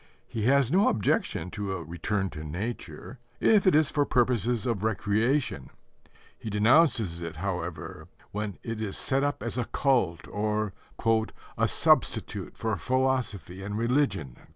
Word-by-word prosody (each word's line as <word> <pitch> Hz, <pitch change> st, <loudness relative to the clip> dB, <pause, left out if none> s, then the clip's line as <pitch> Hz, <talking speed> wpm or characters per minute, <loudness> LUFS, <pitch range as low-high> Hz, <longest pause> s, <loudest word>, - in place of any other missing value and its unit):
He 110 Hz, -3 st, -3 dB
has 135 Hz, 0 st, +4 dB
no 195 Hz, +4 st, +4 dB
objection 90 Hz, -4 st, 0 dB
to 100 Hz, -2 st, -3 dB
a 85 Hz, -, -4 dB
"return 95 Hz, +4 st, -2 dB
to 75 Hz, -, -7 dB
nature," 110 Hz, -, -6 dB, 0.2 s
if 210 Hz, -4 st, +4 dB
it 185 Hz, -, +6 dB
is 155 Hz, -1 st, +4 dB
for 145 Hz, -, +2 dB
purposes 120 Hz, -3 st, +1 dB
of 115 Hz, -6 st, -1 dB
recreation: 110 Hz, -, 0 dB, 0.7 s
he 110 Hz, -, -7 dB
denounces 110 Hz, -, +3 dB
it, 85 Hz, -1 st, -5 dB
however, 90 Hz, -2 st, -5 dB, 0.2 s
when 105 Hz, -2 st, -4 dB
it 115 Hz, -1 st, -4 dB
is 100 Hz, -3 st, -2 dB
set 135 Hz, +1 st, 0 dB
up 145 Hz, -7 st, -1 dB
as 120 Hz, +2 st, -2 dB
a 120 Hz, -, 0 dB
cult 120 Hz, -, +1 dB
or 105 Hz, -1 st, -1 dB, 0.8 s
"a -, -, +2 dB
substitute -, -, +1 dB
for 110 Hz, -2 st, -1 dB
philosophy 130 Hz, -8 st, -1 dB
and 100 Hz, +2 st, -4 dB
religion." 115 Hz, -, 0 dB
110 Hz, 145 wpm, -28 LUFS, 95-130 Hz, 0.8 s, it